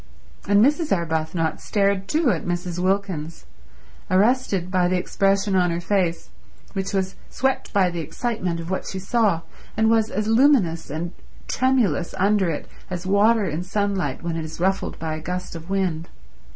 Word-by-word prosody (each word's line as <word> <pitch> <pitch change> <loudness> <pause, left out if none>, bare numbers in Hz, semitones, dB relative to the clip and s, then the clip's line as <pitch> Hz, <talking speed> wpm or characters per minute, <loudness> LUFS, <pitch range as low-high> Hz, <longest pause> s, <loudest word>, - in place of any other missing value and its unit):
And 205 +3 +5
Mrs. 300 +3 +1
Arbuthnot 160 -2 -1
stared 200 -2 +1
too 305 -4 +2
at 170 - -2
Mrs. 175 0 -3
Wilkins, 185 -4 -1 0.6
arrested 195 -2 +2
by 180 -2 +3
the 185 +1 +1
expression 195 +2 +1
on 180 -1 +3
her 170 0 -1
face, 175 -2 -1 0.4
which 195 -1 -2
was 190 -2 -1 0.2
swept 265 0 -1
by 190 -4 +3
the 170 - -4
excitement 180 - -2
of 165 +2 -6
what 190 - -2
she 190 - -5
saw, 195 -3 +1 0.4
and 220 +1 +4
was 220 -1 +3
as 210 0 -2
luminous 225 - +3
and 165 +4 -3 0.4
tremulous 235 - +1
under 195 -1 +3
it 155 - -4 0.2
as 180 -1 -5
water 205 +3 +4
in 160 -1 -2
sunlight 185 -6 -1
when 170 -1 -2
it 165 - -3
is 155 +1 -8
ruffled 190 +2 0
by 160 -1 -3
a 155 - -5
gust 180 +2 -4
of 165 +2 -9
wind. 180 -4 -1
185 Hz, 165 wpm, -23 LUFS, 170-205 Hz, 0.6 s, And